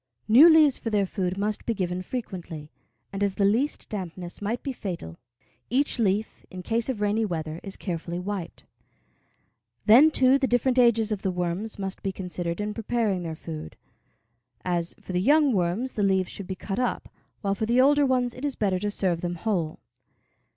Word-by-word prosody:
New 265 +10 +9
leaves 310 -4 +5
for 230 - -3
their 205 -2 +2
food 185 -1 -2
must 210 +1 -2
be 230 - -1
given 180 -2 -2
frequently, 180 -8 -6 0.4
and 195 +1 -1
as 200 -1 0
the 200 - +2
least 235 +9 +1
dampness 180 -3 -6
might 220 +4 -2
be 275 - -3
fatal, 170 - -6 0.5
each 265 +1 +1
leaf, 210 0 0
in 185 -1 -8
case 230 +4 -1
of 235 -6 -2
rainy 210 +2 +1
weather, 160 -5 -3
is 195 - -7
carefully 170 -2 -4
wiped. 180 -2 -5 1.2
Then, 250 +9 +8
too, 265 -2 +4
the 270 - +1
different 245 +1 +2
ages 230 -3 +4
of 205 -2 -2
the 190 - 0
worms 180 +4 -3
must 195 -1 -5
be 195 - -2
considered 180 -2 -4
in 210 0 -2
preparing 220 -4 -1
their 165 -2 -5
food; 80 - -8 0.9
as, 175 -2 -1
for 185 - -8
the 180 - +1
young 290 +4 +4
worms, 190 +7 0
the 210 - -2
leaves 190 -2 +2
should 200 - -8
be 190 - -4
cut 195 +3 -4
up, 250 - -1 0.3
while 195 -2 0
for 215 +2 -2
the 240 +2 +3
older 290 +2 +5
ones 250 -3 +1
it 255 - -10
is 285 -2 -1
better 195 -3 0
to 205 - -1
serve 185 -4 -1
them 175 0 -2
whole. 175 -5 -2
200 Hz, 190 wpm, -26 LUFS, 180-235 Hz, 1.2 s, New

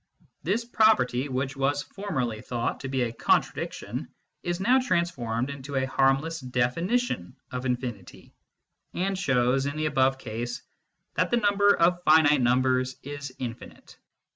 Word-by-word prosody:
This 215 +7 -1
property, 215 - +3
which 135 +1 -2
was 140 +1 0
formerly 130 - -3
thought 120 -1 -3
to 135 - -6
be 130 -1 0
a 115 -1 -2
contradiction, - - -1 0.3
is 175 0 -2
now 245 +7 +4
transformed 150 - -1
into 140 0 -7
a 130 0 +1
harmless 135 +5 +1
definition 130 - -1 0.2
of 125 +1 -3
infinity, 125 -1 -5 0.6
and 195 +2 0
shows, 135 -5 +1
in 145 +2 -4
the 155 - -1
above 135 -3 +2
case, 120 +1 -5 0.5
that - - +1
the 240 - +2
number 205 -2 +4
of 175 +1 +3
finite 155 -3 +5
numbers 130 +1 +2
is 145 -1 -6
infinite. 120 -2 -8
135 Hz, 140 wpm, -27 LUFS, 125-175 Hz, 0.6 s, finite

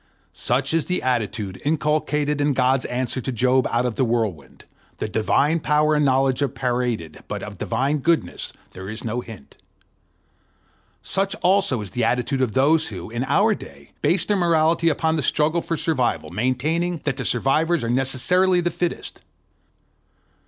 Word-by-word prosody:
Such 135 +4 0
is 165 -1 +1
the 180 - -2
attitude 110 -6 -2
inculcated 150 -1 0
in 145 0 +2
God's 130 0 +2
answer 125 +1 -2
to 130 - -3
Job 130 +2 +2
out 120 +1 +1
of 120 -3 -2
the 135 - +2
whirlwind: 110 - -2 0.3
the - - -3
divine 140 +9 +1
power 150 0 +2
and 150 0 +2
knowledge 135 -1 +2
are 140 - +3
paraded, 120 - -3
but - - -5
of - - -8
the - - -3
divine 135 +6 0
goodness 170 +4 -1 0.2
there 95 +1 -8
is 110 +1 -6
no 115 +2 -2
hint. 110 - -12 1.5
Such 195 +1 -1
also 185 - +3
is 100 - -7
the 125 - -1
attitude 125 +3 0
of 120 -5 0
those 155 +6 +3
who, 95 -1 -8
in 120 +2 -2
our - - +3
own - - 0
day, 70 0 -13
base 165 +5 +2
their 210 - +1
morality 165 -1 +3
upon 160 +1 0
the - - 0
struggle 155 +4 +1
for 165 -1 -3
survival, 135 -8 -1
maintaining 155 +9 -1
that 145 -3 -1
the - - -3
survivors 155 +6 +1
are 115 - -2
necessarily 175 +9 +2
the 175 0 0
fittest. 175 -1 -4
135 Hz, 170 wpm, -22 LUFS, 120-160 Hz, 1.5 s, are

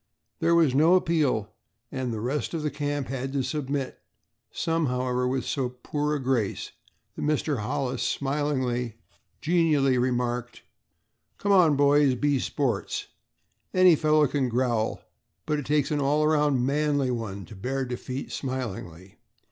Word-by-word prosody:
There 170 0 +3
was 160 -6 +4
no 160 +6 +5
appeal 155 - +1 0.4
and 130 -2 -3
the 110 -2 -4
rest 140 +7 -2
of 160 - -3
the 150 - -1
camp 145 -1 -2
had 135 0 -3
to 135 -2 0
submit, 140 -2 -3 0.5
some, 165 -2 0
however, 125 0 0
with 130 0 -1
so 130 -3 -1
poor 150 0 -1
a - - -2
grace 125 -6 -1 0.4
that - - -6
Mr. 150 -2 0
Hollis, 130 +4 -2
smilingly 130 -5 -1 0.5
genially 150 -6 +3
remarked: 125 -1 -1 0.7
"Come, 180 -8 +4
boys, 145 -1 +4
be 145 +1 +1
sports. 125 -6 -2 0.7
Any 185 -2 +7
fellow 155 0 +3
can 135 -2 0
growl 120 -2 0 0.4
but 150 -1 0
it 145 - -6
takes 145 -1 +1
an 145 -1 +1
all 145 +2 +2
around 150 -4 +2
manly 145 -1 +1
one 100 -5 -4
to 110 - -12
bear 130 +7 -2
defeat 125 +2 -5
smilingly. 100 - -5
135 Hz, 140 wpm, -26 LUFS, 125-150 Hz, 0.7 s, Any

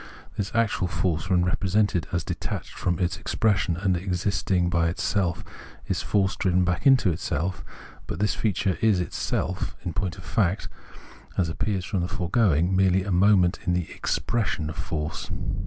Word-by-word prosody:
This 100 -1 -3
actual 110 -5 +1
force, 85 -1 -1
when 90 -2 +3
represented 95 -1 +1
as 85 -1 0
detached - - -4
from 90 -2 -1
its 90 0 -1
expression 100 -6 +1
and 95 0 +1
existing 90 0 0
by 85 -1 +2
itself, 90 0 -1 0.4
is - - -1
force 95 -2 +1
driven 90 -1 +2
back 90 +7 +1
into 130 -9 +5
itseK; 85 +2 -2 0.5
but - - -4
this 105 +1 +2
feature 95 -3 0
is 110 -5 +4
itself, 90 +1 -2
in 85 - -2
point 95 -3 -2
of - - -10
fact, 100 -1 0 0.7
as 90 -4 +2
appears 95 +2 -2
from 95 - -1
the 85 - -1
foregoing, 90 -2 +2
merely 95 0 +3
a 100 - -3
moment 95 -1 +4
in 90 - +3
the 90 -2 -2
expression 80 -9 -1
of - - -9
force. 80 -1 -4
90 Hz, 160 wpm, -25 LUFS, 85-100 Hz, 0.7 s, into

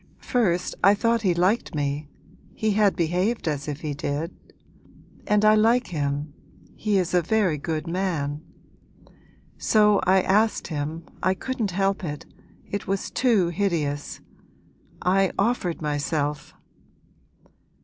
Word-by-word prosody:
First 180 -8 0
I 195 +2 +7
thought 230 +2 +1
he 185 -5 +2
liked 185 +1 +1
me, 145 0 -2 0.5
he 220 -1 0
had 205 -1 +3
behaved 180 +6 0
as 145 -2 -2
if 145 0 -5
he 150 -2 -3
did. 145 +4 -3 0.9
And 210 0 +3
I 215 - +7
like 230 +2 +3
him, 145 -2 -2 0.4
he 210 -2 0
is 185 -1 0
a 180 - +4
very 185 -4 +1
good 155 +1 -3
man. 165 -5 -2 1.2
So 210 -2 +4
I 190 0 +4
asked 215 +1 +2
him, 155 +1 -4 0.2
I 185 +1 +2
couldn't 235 0 -3
help 195 +1 0
it, 150 -3 -5 0.4
it 205 - -4
was 195 0 -2
too 220 -9 +2
hideous 160 -6 -2 0.8
I 190 +1 +3
offered 195 -7 0
myself!' 150 0 -2
180 Hz, 130 wpm, -24 LUFS, 150-205 Hz, 1.2 s, I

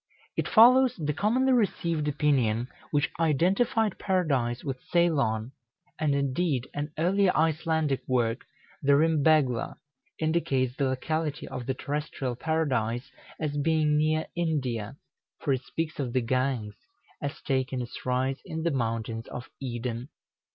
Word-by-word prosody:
It - - -1
follows 250 +2 +6
the 150 -3 -2
commonly 255 - +2
received 170 -9 +1
opinion 130 -6 +1 0.2
which 145 -1 +1
identified 190 - +2
Paradise 140 -11 0
with 130 -3 -4
Ceylon; 135 -10 +2 0.5
and, 150 -3 +2
indeed, 140 -1 0
an 145 +1 -3
earlier 185 +4 +3
Icelandic 160 -3 +1
work, 120 -3 +1 0.4
the 140 0 +4
"Rymbegla," 150 -5 +3 0.4
indicates 140 -6 0
the 140 - 0
locality 150 +3 -2
of 120 - -6
the 130 - 0
terrestrial 140 -3 -3
Paradise 125 -5 -1 0.3
as 150 -2 -2
being 155 0 +2
near 155 +1 +2
India, 135 -9 -2 0.4
for 140 - +1
it 130 - -1
speaks 165 0 -4
of 125 -4 -2
the 130 - +2
Ganges 125 -3 -1 0.4
as 140 -1 -4
taking 130 -1 0
its 120 -1 -7
rise 130 +1 0
in 160 0 -5
the 170 - +1
mountains 115 -3 -2
of 125 - -8
Eden. 120 0 -4
145 Hz, 130 wpm, -28 LUFS, 125-160 Hz, 0.5 s, follows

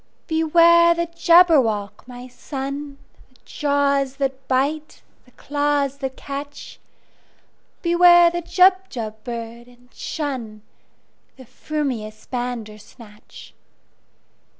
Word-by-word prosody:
"Beware 340 +1 +4
the 340 0 -1
Jabberwock, 325 - +2
my 250 0 -10
son! 275 +2 -7 0.3
The 255 - -28
jaws 280 -2 0
that 270 -1 -4
bite, 290 +4 -2 0.2
the 250 - -23
claws 285 -1 -2
that 265 -2 -5
catch! 285 +1 -8 1.0
Beware 345 0 +5
the 345 0 -3
Jubjub 345 - +1
bird, 235 0 -7
and 245 0 -22
shunThe 255 -9 -6 0.8
frumious 240 -7 -5
Bandersnatch!" 225 -3 -8
275 Hz, 85 wpm, -21 LUFS, 245-315 Hz, 1.0 s, Beware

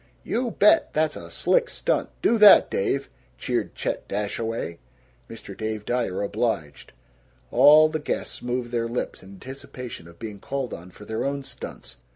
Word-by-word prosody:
"You 245 +1 -1
bet; 210 -1 +4
that's 155 0 +1
a - - -9
slick - - +2
stunt; - - -1
do 230 - +3
that, 210 -1 +8
Dave!" 135 +8 0 0.3
cheered - - -2
Chet - - -3
Dashaway. 105 -4 -3 0.5
Mr. - - -9
Dave 110 -1 -4
Dyer 120 -6 -1
obliged. 100 - -2 0.6
All 155 +1 +7
the 155 0 -3
guests 150 - -4
moved 120 0 -3
their 115 -1 0
lips 120 +2 -4
in 95 +1 -13
anticipation 125 -3 -9
of 85 0 -15
being 105 -3 -7
called 135 +3 -4
on 85 +2 -9
for 105 +3 -14
their 110 +1 -3
own 140 0 -2
stunts. - - -9
120 Hz, 160 wpm, -25 LUFS, 105-140 Hz, 0.6 s, that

